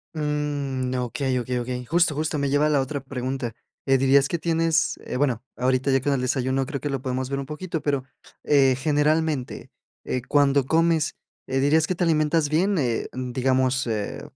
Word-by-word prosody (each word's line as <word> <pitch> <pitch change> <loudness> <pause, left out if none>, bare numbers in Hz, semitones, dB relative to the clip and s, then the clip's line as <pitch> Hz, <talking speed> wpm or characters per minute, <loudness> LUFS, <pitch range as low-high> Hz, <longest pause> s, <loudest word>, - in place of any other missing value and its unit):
Mm, 145 -4 -2
okey, 125 +1 -1
okey, 125 +1 -2
okey. 125 0 -4
Justo, 170 +2 +2
justo, 155 0 -1
me 140 -1 0
lleva 145 +2 +3
a - - +2
la 145 -2 +3
otra 140 +2 -3
pregunta. 130 -3 -4 0.3
Eh, 135 -1 +4
¿dirías 135 +1 +4
que 170 - -1
tienes, 165 -1 +1
eh, - - -5
bueno, 125 -4 0
ahorita 130 +2 +1
ya 135 -1 +3
con 145 - 0
el 135 - 0
desayuno 130 +1 0
creo 140 -1 -5
que 145 - -2
lo 135 -2 -2
podemos 130 0 -3
ver 140 0 -2
un 135 - -4
poquito, 160 +2 -5
pero, 140 -3 0 0.4
eh, 135 -3 +4
generalmente, 150 -1 0 0.3
eh, 130 - -2
cuando 140 -2 +3
comes, 160 0 +2 0.3
eh, 135 0 0
¿dirías 155 +3 +3
que 185 - -1
te 175 - -1
alimentas 155 -1 +2
bien? 185 +5 +2
Eh, 120 -6 0
digamos, 130 0 0
eh, 105 -2 -3
140 Hz, 190 wpm, -24 LUFS, 130-150 Hz, 0.4 s, Eh